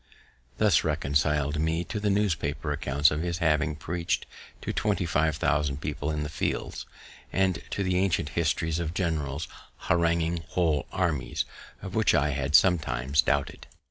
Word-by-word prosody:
This 105 Hz, -7 st, +4 dB
reconcil'd 75 Hz, 0 st, +1 dB
me 80 Hz, +2 st, 0 dB
to 105 Hz, +5 st, -4 dB
the 105 Hz, 0 st, 0 dB
newspaper 80 Hz, -8 st, 0 dB
accounts 70 Hz, 0 st, +2 dB
of 75 Hz, +1 st, -1 dB
his 85 Hz, -1 st, -2 dB
having 80 Hz, -2 st, +1 dB
preach'd 85 Hz, +3 st, -2 dB, 0.4 s
to -, -, -2 dB
twenty 105 Hz, -3 st, 0 dB
five 80 Hz, -3 st, +1 dB
thousand 75 Hz, -2 st, 0 dB
people 75 Hz, 0 st, -3 dB
in 75 Hz, -1 st, -1 dB
the -, -, -3 dB
fields, 80 Hz, -, -3 dB, 0.4 s
and 95 Hz, -2 st, +1 dB
to 100 Hz, -, -2 dB
the 90 Hz, -1 st, +1 dB
ancient 95 Hz, -6 st, +1 dB
histories 80 Hz, +1 st, 0 dB
of 85 Hz, 0 st, -3 dB
generals 80 Hz, -4 st, -1 dB, 0.4 s
haranguing 85 Hz, 0 st, +2 dB
whole 80 Hz, -5 st, 0 dB
armies, 85 Hz, -7 st, -1 dB, 0.4 s
of 95 Hz, -, -6 dB
which 110 Hz, -2 st, +3 dB
I 75 Hz, -1 st, +3 dB
had 70 Hz, +1 st, 0 dB
sometimes 70 Hz, -6 st, +3 dB
doubted. -, -, -1 dB
80 Hz, 150 wpm, -27 LUFS, 75-85 Hz, 0.4 s, This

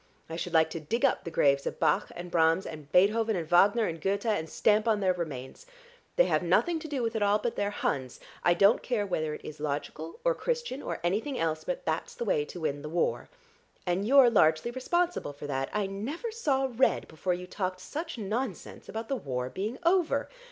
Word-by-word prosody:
I -, -, -3 dB
should 175 Hz, +1 st, -4 dB
like 160 Hz, 0 st, +4 dB
to 165 Hz, -, -4 dB
dig 225 Hz, +11 st, 0 dB
up -, -, +1 dB
the -, -, -3 dB
graves 140 Hz, -3 st, +2 dB
of -, -, -4 dB
Bach -, -, +2 dB
and 175 Hz, 0 st, -7 dB
Brahms 165 Hz, +2 st, +3 dB
and 150 Hz, -2 st, -9 dB
Beethoven 215 Hz, +4 st, +4 dB
and 165 Hz, -3 st, -3 dB
Wagner 200 Hz, +7 st, +5 dB
and 165 Hz, -3 st, -4 dB
Goethe, 200 Hz, +4 st, -1 dB
and 205 Hz, -8 st, 0 dB
stamp 210 Hz, +8 st, +2 dB
on 215 Hz, -2 st, +3 dB
their 190 Hz, -2 st, +2 dB
remains. 155 Hz, -, -6 dB, 0.5 s
They -, -, +5 dB
have -, -, +1 dB
nothing 345 Hz, -2 st, +2 dB
to 315 Hz, -, -7 dB
do 280 Hz, -5 st, -2 dB
with 230 Hz, 0 st, -1 dB
it 220 Hz, -, -1 dB
all 205 Hz, 0 st, +4 dB
but 230 Hz, +2 st, -3 dB
they're 205 Hz, 0 st, 0 dB
Huns. 130 Hz, -10 st, -2 dB, 0.2 s
I 175 Hz, -, +4 dB
don't 200 Hz, +5 st, +5 dB
care 230 Hz, -5 st, -1 dB
whether 155 Hz, -5 st, -2 dB
it -, -, -12 dB
is 155 Hz, -, -8 dB
logical 150 Hz, +2 st, -4 dB
or -, -, +4 dB
Christian 480 Hz, -, -3 dB
or -, -, -4 dB
anything 220 Hz, +10 st, -1 dB
else, 160 Hz, -1 st, -1 dB
but -, -, -4 dB
that's -, -, -2 dB
the 480 Hz, 0 st, -4 dB
way 460 Hz, -3 st, +1 dB
to 175 Hz, -, -9 dB
win 145 Hz, -2 st, -2 dB
the 150 Hz, -, -6 dB
war. 170 Hz, +2 st, -1 dB, 0.6 s
And 185 Hz, +3 st, 0 dB
you're 265 Hz, -2 st, +7 dB
largely 160 Hz, +1 st, +3 dB
responsible 340 Hz, -, -1 dB
for 145 Hz, +1 st, -9 dB
that; 135 Hz, -2 st, -2 dB
I 210 Hz, -1 st, 0 dB
never 245 Hz, -, -4 dB
saw 280 Hz, -12 st, +1 dB
red 260 Hz, -, +2 dB
before 175 Hz, +3 st, -2 dB
you 180 Hz, +1 st, -7 dB
talked 185 Hz, 0 st, -3 dB
such 315 Hz, -, -5 dB
nonsense 220 Hz, 0 st, -4 dB
about 225 Hz, +1 st, -5 dB
the 275 Hz, -, -1 dB
war 125 Hz, -, -3 dB
being 210 Hz, -, -3 dB
over. 350 Hz, -1 st, +2 dB
200 Hz, 215 wpm, -29 LUFS, 160-245 Hz, 0.6 s, you're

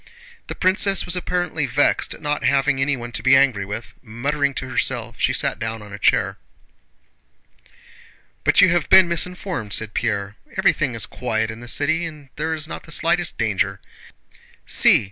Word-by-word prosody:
The -, -, -6 dB
princess 195 Hz, +1 st, +2 dB
was 180 Hz, -, 0 dB
apparently 175 Hz, -4 st, -2 dB
vexed 135 Hz, +4 st, +1 dB
at -, -, -17 dB
not 150 Hz, 0 st, -2 dB
having 135 Hz, -1 st, +2 dB
anyone 130 Hz, -4 st, -1 dB
to -, -, -3 dB
be 130 Hz, +1 st, +5 dB
angry 130 Hz, -8 st, +3 dB
with. 105 Hz, +4 st, -7 dB
Muttering 140 Hz, +5 st, -2 dB
to 130 Hz, -, -4 dB
herself, 120 Hz, -2 st, -2 dB
she -, -, +2 dB
sat 140 Hz, +1 st, -1 dB
down 110 Hz, -1 st, -4 dB
on 105 Hz, -1 st, -12 dB
a 105 Hz, -, -8 dB
chair. -, -, +1 dB, 2.0 s
"But -, -, +4 dB
you 185 Hz, -, +6 dB
have 170 Hz, -3 st, 0 dB
been 190 Hz, -1 st, +7 dB
misinformed," 170 Hz, -, -2 dB
said 110 Hz, -1 st, -1 dB
Pierre. 100 Hz, -1 st, -2 dB, 0.2 s
"Everything -, -, +1 dB
is -, -, +1 dB
quiet 110 Hz, 0 st, -2 dB
in 110 Hz, -, -10 dB
the 120 Hz, -, -10 dB
city 160 Hz, +7 st, +1 dB
and 150 Hz, -4 st, -12 dB
there 160 Hz, +1 st, -2 dB
is 155 Hz, 0 st, -3 dB
not -, -, -7 dB
the 165 Hz, -, -12 dB
slightest 170 Hz, +1 st, 0 dB
danger. 100 Hz, -3 st, -1 dB, 0.9 s
See! -, -, +6 dB
140 Hz, 170 wpm, -21 LUFS, 115-160 Hz, 2.0 s, been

